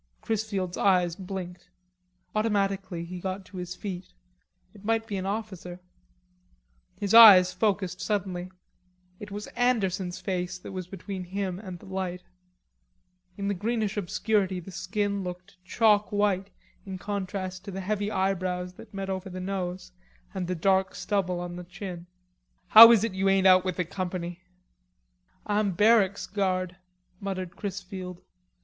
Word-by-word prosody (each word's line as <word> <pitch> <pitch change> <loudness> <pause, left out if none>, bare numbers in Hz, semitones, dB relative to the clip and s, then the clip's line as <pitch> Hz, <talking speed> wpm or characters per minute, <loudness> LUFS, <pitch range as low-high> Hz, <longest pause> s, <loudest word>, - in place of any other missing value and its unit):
Chrisfield's 200 -5 -2
eyes 180 -4 +3
blinked. 180 -2 -7 0.6
Automatically 195 -5 0
he 180 +1 -7
got 190 +1 -4
to 185 - -11
his 180 0 -5
feet; 185 -2 -7 0.6
it 205 -2 -16
might 225 +1 +1
be 210 -3 -4
an 190 0 -3
officer. 195 -4 -5 1.2
His 200 0 -1
eyes 195 -6 +10
focussed 185 -2 0
suddenly. 185 -3 -2 0.7
It 210 - -8
was 205 +1 -6
Anderson's 195 -7 0
face 180 -2 -3
that 180 - -10
was 185 -2 -5
between 190 0 -6
him 190 0 -3
and 185 -4 -8
the - - -16
light. 185 -1 -4 1.1
In 200 0 -3
the 200 - +1
greenish 215 +1 -1
obscurity 200 -1 0
the 180 +2 -10
skin 200 +2 -2
looked 180 +1 -9
chalk 210 +2 +3
white 200 -2 +1 0.3
in 190 -1 -6
contrast 185 -1 -4
to - - -6
the 195 +1 -5
heavy 205 +1 -1
eyebrows 185 -2 -1
that 210 -2 -13
met 195 0 -4
over 190 0 -4
the 185 0 -6
nose 185 -1 -4 0.4
and 185 -3 -3
the 180 - -1
dark 190 +2 +2
stubble 185 -4 -1
on 175 0 -5
the 180 - -7
chin. 180 -1 -8 0.6
"How 230 +2 +12
is 225 -3 +5
it 225 - -1
you 195 +1 +1
ain't 195 0 +3
out 185 -1 +7
with 185 -2 -2
the 180 - -1
company?" 175 0 -4 1.0
"Ah'm 205 -2 +1
barracks 205 0 +4
guard," 185 -2 -1 0.4
muttered 185 -2 -4
Chrisfield. 185 -2 -6
190 Hz, 145 wpm, -27 LUFS, 180-205 Hz, 1.2 s, How